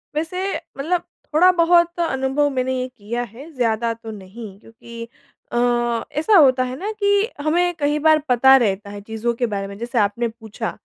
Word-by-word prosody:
वैसे, 365 +5 -2 0.2
मतलब 335 +6 0 0.3
थोड़ा-बहुत 345 0 +4
अनुभव 270 -2 0
मैंने 260 -1 -1
ये 255 - -3
किया 235 -1 -5
है, 245 +8 -11
ज़्यादा 230 -1 0
तो 225 -1 -10
नहीं 200 0 -10
क्योंकि 230 +1 -11 0.4
अ, - - -2 0.5
ऐसा 320 +8 +2
होता 260 -4 +5
है 255 0 -4
ना 415 +3 -3
कि 405 +2 +2
हमें 350 +4 +1
कही 295 +1 +1
बार 315 0 +4
पता 265 +2 +6
रहता 205 -4 -1
है 205 0 -8
चीज़ों 225 +3 -3
के 245 - +2
बारे 200 -2 -3
में 200 - -9
जैसे 235 +2 -5
आपने 210 +4 +1
पूछा, 225 0 -6
255 Hz, 170 wpm, -21 LUFS, 225-315 Hz, 0.5 s, पता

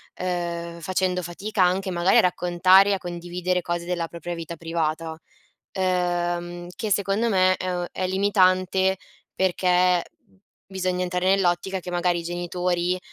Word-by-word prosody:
ehm, 170 -2 -3
facendo 185 +1 -1
fatica 190 +4 -3
anche 185 +2 +1
magari 175 +1 +3
a - - +8
raccontare 180 +2 +4
e - - +3
a - - +1
condividere 180 0 -3
cose 175 0 -3
della 175 -2 -2
propria 170 +1 -6
vita 165 0 -6
privata; 165 -1 -2 0.6
ehm, 175 -1 -1
che 215 -2 -2
secondo 200 +4 +1
me, 185 -2 +3
ehm, 180 -1 -3
è 185 - -2
limitante 190 -1 +2 0.4
perché 180 -1 +2 0.6
bisogna 185 -1 -2
entrare 180 0 -1
nell'ottica 190 0 0
che 180 - -7
magari 175 0 0
i - - -7
genitori, 175 +1 -1
180 Hz, 135 wpm, -24 LUFS, 175-185 Hz, 0.6 s, a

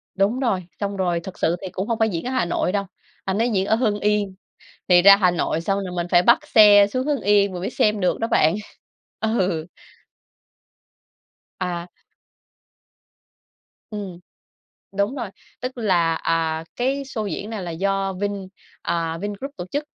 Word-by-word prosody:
Đúng 205 +6 +1
rồi, 200 -9 0 0.2
xong 200 -1 -3
rồi 175 -3 0
thật 190 - -9
sự 165 +2 +2
thì 190 - -5
cũng 190 +2 -4
hông 230 -1 -1
phải 220 0 +3
diễn 170 +1 -4
ở - - -2
Hà 255 -7 +1
Nội 175 +1 0
đâu. 200 -1 -1 0.4
Anh 190 +1 -1
ấy 235 +2 +2
diễn 190 -3 +1
ở 215 - +2
Hưng 215 -3 0
Yên, 205 -2 0 0.5
thì 175 -1 +6
ra 200 0 +9
Hà 185 -3 +3
Nội 165 -1 -1
xong 195 +3 -1
rồi 180 - -6
mình 175 0 -1
phải 175 0 +5
bắt 250 - +6
xe 205 -4 +7
xuống 255 +5 -2
Hưng 290 -2 0
Yên 200 -1 +3
mình 180 - -5
mới 190 - -3
xem 210 -1 +1
được 180 - +1
đó 225 - +1
bạn, 160 +3 +3 0.7
ừ. 190 -8 0 1.9
À. 175 -1 -3 2.0
Ừm, 195 -4 -6 0.8
đúng 200 +7 0
rồi, 235 -7 -4 0.3
tức 255 0 -5
là, 175 -7 +2
à, 160 -1 -1
cái 270 +3 -1
sô 220 -5 -4
diễn 200 +3 -4
này 215 -4 -5
là 175 - -5
do 195 +2 -1
Vin, 205 +2 -2 0.5
à, 165 -1 -2
Vingroup 205 +7 -5
tổ 175 - -5
chức. 290 +1 -1
200 Hz, 175 wpm, -22 LUFS, 180-215 Hz, 2.0 s, ra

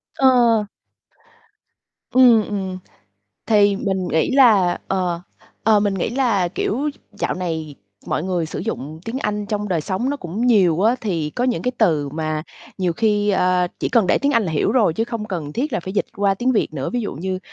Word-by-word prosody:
Ờ. 240 -5 +4 1.5
Ừm, 245 -4 +6
ừm, 190 -3 -4 0.7
thì 205 -2 +4
mình 190 -2 -2
nghĩ 160 - +1
là 220 -10 +4
ờ, 180 -3 -1 0.4
ờ, 215 -2 +4
mình 205 -1 0
nghĩ 190 +3 -2
là, 230 -9 +1
kiểu, 270 +10 -2
d - - -23 0.2
dạo - - -1
này 160 -5 -4 0.3
mọi 155 - -1
người 175 -3 -1
sử - - -6
dụng 155 +4 -5
tiếng 240 +4 -4
Anh 210 -4 -2
trong 210 0 -3
đời 170 -4 0
sống 195 - -2
nó 285 - -2
cũng 205 +4 -3
nhiều 185 -8 +4
á, 230 +3 +4
thì 165 -9 -2
có 245 - -2
những 250 -2 0
cái 250 - -1
từ 155 -10 +2
mà 155 +1 -3 0.4
nhiều 180 -2 0
khi, 210 +1 +1
ờ, 180 -1 +2
chỉ - - -1
cần 225 -6 +3
để - - +3
tiếng 285 +1 +1
Anh 230 - +3
là 165 -5 -3
hiểu 150 - +1
rồi 220 -10 +3
chứ 225 - 0
không 230 -3 -5
cần 165 -8 -5
thiết 275 +3 -2
là 215 - -1
phải 185 +3 -6
dịch 205 - 0
qua 200 -1 +2
tiếng 255 +5 0
Việt 215 - +1
nữa, 135 - -3
ví 245 - -1
dụ 205 - -4
như 185 +4 -3
200 Hz, 205 wpm, -20 LUFS, 175-230 Hz, 1.5 s, Ừm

